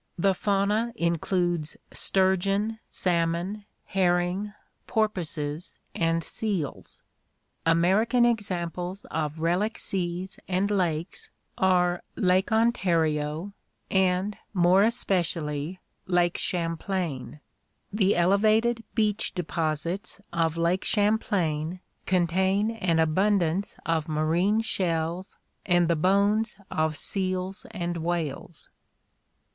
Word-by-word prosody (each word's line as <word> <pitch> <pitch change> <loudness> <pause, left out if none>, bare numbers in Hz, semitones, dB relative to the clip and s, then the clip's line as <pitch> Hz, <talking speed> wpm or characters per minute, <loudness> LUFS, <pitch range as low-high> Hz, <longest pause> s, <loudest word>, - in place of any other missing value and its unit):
The 195 +2 +3
fauna 205 +4 0
includes 170 -2 0 0.2
sturgeon, 195 +3 +1
salmon, 175 +3 0 0.2
herring, 180 +1 +1 0.4
porpoises, 175 -8 -2 0.2
and 165 0 +1
seals. 195 -10 -4 0.6
American 195 +9 +4
examples 185 -4 -2
of 155 -1 -2
relic 180 +7 +1
seas 185 +1 -3
and 190 +2 0
lakes 175 -3 -1 0.3
are 180 -2 +2
Lake 185 +2 +2
Ontario 170 -6 +1 0.4
and 190 +1 +1 0.2
more 180 +2 +5
especially 175 -7 0 0.3
Lake 175 -1 +2
Champlain. 165 -4 -2 0.5
The 205 -2 +3
elevated 215 +6 +3
beach 210 -4 +1
deposits 165 +2 -2
of 165 -1 +1
Lake 170 +3 +1
Champlain 185 -6 +1 0.3
contain 190 +4 +2
an 185 -7 0
abundance 185 +2 +1
of 165 -1 0
marine 170 +8 +2
shells 175 -3 -2 0.3
and 175 -2 +3
the 170 - +2
bones 200 +6 +2 0.2
of 155 -1 0
seals 185 0 -1
and 175 -5 -3
whales. 165 -2 -3
180 Hz, 90 wpm, -27 LUFS, 165-200 Hz, 0.6 s, more